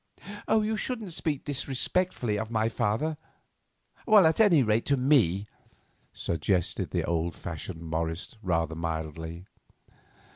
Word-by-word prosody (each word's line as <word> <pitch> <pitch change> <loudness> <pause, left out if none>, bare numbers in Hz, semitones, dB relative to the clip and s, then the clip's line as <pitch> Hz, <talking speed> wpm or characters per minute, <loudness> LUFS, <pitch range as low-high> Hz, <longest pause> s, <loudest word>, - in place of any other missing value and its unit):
"You 220 0 +2
shouldn't 220 -7 -3
speak 150 -4 -1
disrespectfully 135 - 0
of 110 - -4
my 110 -1 +1
father; 120 +8 -1 0.9
at 190 -6 +6
any 180 -11 +6
rate, 110 0 +2
to 140 - +3
me," 120 - +3 0.7
suggested 85 +2 -1
the - - -1
old 85 0 -1
fashioned 85 +1 -7
Morris, 80 +5 -3
rather 85 -4 0
mildly. 80 +1 -5
110 Hz, 110 wpm, -28 LUFS, -, 0.9 s, at